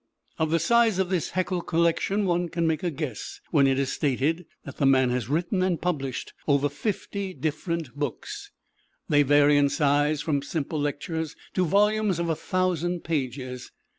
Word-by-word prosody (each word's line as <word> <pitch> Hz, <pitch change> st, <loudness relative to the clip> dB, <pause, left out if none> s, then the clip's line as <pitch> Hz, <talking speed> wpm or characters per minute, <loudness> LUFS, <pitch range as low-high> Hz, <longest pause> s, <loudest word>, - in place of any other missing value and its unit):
Of 160 Hz, -1 st, +1 dB
the 165 Hz, -, +3 dB
size 225 Hz, +4 st, +3 dB
of 190 Hz, -2 st, 0 dB
this 180 Hz, -4 st, 0 dB
Haeckel 185 Hz, -1 st, -1 dB
collection 170 Hz, +5 st, +1 dB
one 175 Hz, -1 st, 0 dB
can 170 Hz, +1 st, -1 dB
make 160 Hz, -2 st, +1 dB
a 180 Hz, -, 0 dB
guess 145 Hz, -7 st, -5 dB
when 140 Hz, -3 st, +5 dB
it 135 Hz, -1 st, +2 dB
is 135 Hz, -1 st, 0 dB
stated 150 Hz, +5 st, 0 dB, 0.2 s
that -, -, -9 dB
the 140 Hz, -, +3 dB
man 130 Hz, -2 st, +4 dB
has 125 Hz, -2 st, -2 dB
written 175 Hz, +6 st, 0 dB
and 185 Hz, -3 st, +1 dB
published 140 Hz, -8 st, -3 dB
over 145 Hz, -1 st, +3 dB
fifty 195 Hz, +3 st, -4 dB
different 155 Hz, -2 st, -3 dB
books. 145 Hz, -4 st, -5 dB, 0.6 s
These 145 Hz, -1 st, +4 dB
vary 145 Hz, 0 st, +5 dB
in 140 Hz, -1 st, +3 dB
size 145 Hz, +1 st, +2 dB
from 150 Hz, -1 st, 0 dB
simple 150 Hz, +1 st, -3 dB
lectures 150 Hz, +2 st, -3 dB, 0.2 s
to 185 Hz, -, +2 dB
volumes 210 Hz, +1 st, +2 dB
of 170 Hz, 0 st, -1 dB
a 160 Hz, -, +1 dB
thousand 180 Hz, -1 st, -1 dB
pages. 130 Hz, -4 st, -3 dB
160 Hz, 170 wpm, -26 LUFS, 145-180 Hz, 0.6 s, when